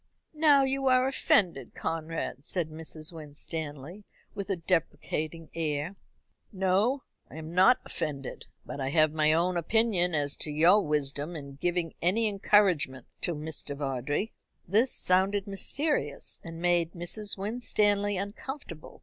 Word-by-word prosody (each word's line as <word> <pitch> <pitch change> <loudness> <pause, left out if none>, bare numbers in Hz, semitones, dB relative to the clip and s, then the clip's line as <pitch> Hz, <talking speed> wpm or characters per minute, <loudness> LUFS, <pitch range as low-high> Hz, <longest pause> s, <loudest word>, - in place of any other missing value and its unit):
"Now 300 -3 +5
you 270 0 0
are 255 0 +4
offended, 175 - +1
Conrad," 160 -3 -3
said 170 0 0
Mrs. 155 +1 -4
Winstanley, 155 +2 -6 0.3
with 200 0 -5
a 195 - +1
deprecating 165 -2 -2
air. 155 +2 -2 0.6
"No, 200 +7 +1 0.3
I - - -12
am 160 +1 -7
not 190 +8 +6
offended; 140 -4 -5 0.2
but 140 - -6
I 135 - -1
have 155 +1 +3
my 155 -1 +3
own 175 +3 +2
opinion 180 -2 +2
as 145 -1 0
to - - -4
your 170 +7 +5
wisdom 150 +1 -1
in 140 -3 -8
giving 175 -2 0
any 215 +6 +2
encouragement 190 - +2 0.2
to 170 - -1
Mr. 150 -2 -5
Vawdrey." 140 - -2 0.3
This 220 +8 +3
sounded 190 +2 +3
mysterious, 200 - 0
and 165 0 -8
made 175 -1 +1
Mrs. 195 +5 -3
Winstanley 205 -1 +1
uncomfortable. 200 - -7
170 Hz, 130 wpm, -29 LUFS, 155-205 Hz, 0.6 s, not